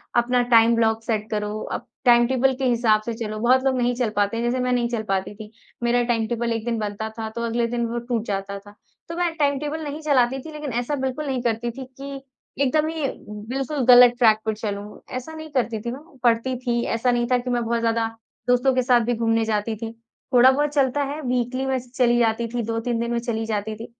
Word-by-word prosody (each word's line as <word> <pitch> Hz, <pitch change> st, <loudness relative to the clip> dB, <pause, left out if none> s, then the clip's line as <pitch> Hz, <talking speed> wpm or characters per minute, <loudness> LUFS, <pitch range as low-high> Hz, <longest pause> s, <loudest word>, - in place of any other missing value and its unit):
अपना 245 Hz, +1 st, +3 dB
time 230 Hz, 0 st, +6 dB
block 225 Hz, -1 st, +1 dB
set 215 Hz, -2 st, -2 dB
करो, 210 Hz, 0 st, -2 dB
आप -, -, -5 dB, 0.2 s
टाइम 240 Hz, -1 st, +6 dB
टेबल 265 Hz, +1 st, +2 dB
के 265 Hz, +1 st, -2 dB
हिसाब 230 Hz, -3 st, +3 dB
से 230 Hz, +2 st, -4 dB
चलो, 215 Hz, -1 st, -5 dB
बहुत 255 Hz, +3 st, +3 dB
लोग 265 Hz, -1 st, +1 dB
नहीं 245 Hz, 0 st, +1 dB
चल 245 Hz, -2 st, 0 dB
पाते 205 Hz, +2 st, +1 dB
हैं 230 Hz, -, -1 dB
जैसे 240 Hz, +2 st, 0 dB
मैं 250 Hz, -, 0 dB
नहीं 240 Hz, -1 st, +1 dB
चल 230 Hz, -2 st, -2 dB
पाती 195 Hz, -1 st, -2 dB
थी। 210 Hz, 0 st, -10 dB, 0.3 s
मेरा 240 Hz, 0 st, +2 dB
टाइम 225 Hz, -2 st, +1 dB
टेबल 235 Hz, +1 st, -1 dB
एक 225 Hz, 0 st, -4 dB
दिन 235 Hz, -1 st, -1 dB
बनता 210 Hz, +1 st, -3 dB
था 220 Hz, -1 st, -3 dB
तो 235 Hz, -, -3 dB
अगले 235 Hz, 0 st, 0 dB
दिन 235 Hz, 0 st, -1 dB
वो 240 Hz, -, -2 dB
टूट 235 Hz, -2 st, -2 dB
जाता 200 Hz, -1 st, -3 dB
था। 205 Hz, +1 st, -16 dB, 0.3 s
तो 335 Hz, -, -4 dB
मैं 350 Hz, -1 st, 0 dB
टाइम 285 Hz, -3 st, +2 dB
टेबल 300 Hz, +2 st, -4 dB
नहीं 295 Hz, +1 st, -5 dB
चलाती 265 Hz, -4 st, +2 dB
थी 320 Hz, -, -7 dB
लेक़िन 300 Hz, -2 st, -5 dB
ऐसा 245 Hz, +5 st, -1 dB
बिल्कुल 265 Hz, +2 st, -3 dB
नहीं 260 Hz, -2 st, -1 dB
करती 235 Hz, 0 st, -1 dB
थी 265 Hz, +3 st, -8 dB, 0.2 s
कि 275 Hz, 0 st, -6 dB, 0.4 s
एकदम 305 Hz, +4 st, +2 dB
ही 320 Hz, -2 st, -2 dB, 0.4 s
बिल्कुल 270 Hz, +2 st, -2 dB
ग़लत 245 Hz, -1 st, +8 dB
ट्रैक 225 Hz, -3 st, +5 dB
पर 220 Hz, -, 0 dB
चलूँ। 205 Hz, -1 st, -5 dB, 0.2 s
ऐसा 255 Hz, +6 st, -6 dB
नहीं 315 Hz, 0 st, -8 dB
करती 235 Hz, -5 st, 0 dB
थी 235 Hz, +2 st, -4 dB
मैं, 285 Hz, +3 st, -11 dB
पढ़ती 240 Hz, +2 st, +2 dB
थी, 240 Hz, -1 st, -1 dB
ऐसा 230 Hz, +2 st, +1 dB
नहीं 240 Hz, 0 st, +1 dB
था 250 Hz, -, +5 dB
कि 245 Hz, +1 st, -4 dB
मैं 240 Hz, -1 st, 0 dB
बहुत 235 Hz, +1 st, 0 dB
ज़्यादा 230 Hz, 0 st, +1 dB, 0.4 s
दोस्तों 250 Hz, +2 st, +3 dB
के 255 Hz, -, +3 dB
साथ 245 Hz, -1 st, +4 dB
भी 245 Hz, -, +1 dB
घूमने 225 Hz, 0 st, +1 dB
जाती 220 Hz, 0 st, -1 dB
थी। 225 Hz, +1 st, -6 dB, 0.4 s
थोड़ा 250 Hz, +1 st, +7 dB
बहुत 295 Hz, +2 st, +1 dB
चलता 280 Hz, 0 st, +2 dB
है 285 Hz, +3 st, -4 dB
वीकली 250 Hz, 0 st, -1 dB
में 265 Hz, 0 st, 0 dB
चली 245 Hz, -1 st, +1 dB
जाती 230 Hz, 0 st, +1 dB
थी, 240 Hz, +1 st, -3 dB
2-3 230 Hz, +1 st, -2 dB
दिन 235 Hz, 0 st, -2 dB
में 235 Hz, -, 0 dB
चली 230 Hz, -2 st, -3 dB
जाती 215 Hz, 0 st, -2 dB
थी। 225 Hz, +2 st, -8 dB
240 Hz, 240 wpm, -23 LUFS, 225-260 Hz, 0.4 s, ग़लत